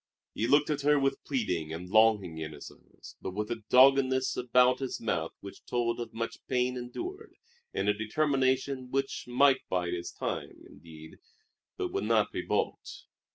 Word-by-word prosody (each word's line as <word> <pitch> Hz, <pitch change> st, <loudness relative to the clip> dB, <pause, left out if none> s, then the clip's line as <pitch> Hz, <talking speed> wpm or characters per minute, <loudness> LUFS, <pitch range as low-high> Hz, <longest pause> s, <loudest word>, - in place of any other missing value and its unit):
He 115 Hz, -, -1 dB
looked 145 Hz, +3 st, +4 dB
at 145 Hz, -1 st, -1 dB
her 145 Hz, +1 st, +4 dB
with 135 Hz, 0 st, 0 dB
pleading 90 Hz, -, -2 dB
and 85 Hz, +3 st, -6 dB
longing 105 Hz, -5 st, +3 dB
in 80 Hz, -1 st, -5 dB
his 75 Hz, -, -10 dB
eyes, -, -, -16 dB
but 95 Hz, -, -5 dB
with 105 Hz, +2 st, -3 dB
a 115 Hz, -1 st, -3 dB
doggedness 130 Hz, 0 st, +5 dB
about 125 Hz, +1 st, +3 dB
his 135 Hz, -2 st, -4 dB
mouth 85 Hz, -8 st, -2 dB
which 100 Hz, -, -11 dB
told 120 Hz, -1 st, -1 dB
of 115 Hz, -1 st, -5 dB
much 115 Hz, 0 st, -5 dB
pain 125 Hz, 0 st, 0 dB
endured 360 Hz, -, -7 dB, 0.4 s
and -, -, -2 dB
a 105 Hz, -, +4 dB
determination 130 Hz, +3 st, 0 dB
which 135 Hz, +1 st, -2 dB
might 130 Hz, +2 st, +4 dB
bide 90 Hz, -1 st, -1 dB
its 85 Hz, -1 st, -4 dB
time, -, -, -5 dB
indeed, 80 Hz, +1 st, -14 dB, 0.6 s
but -, -, -3 dB
would 100 Hz, -, -1 dB
not 110 Hz, -1 st, +2 dB
be -, -, -3 dB
balked. -, -, -3 dB
120 Hz, 170 wpm, -29 LUFS, 100-135 Hz, 0.6 s, doggedness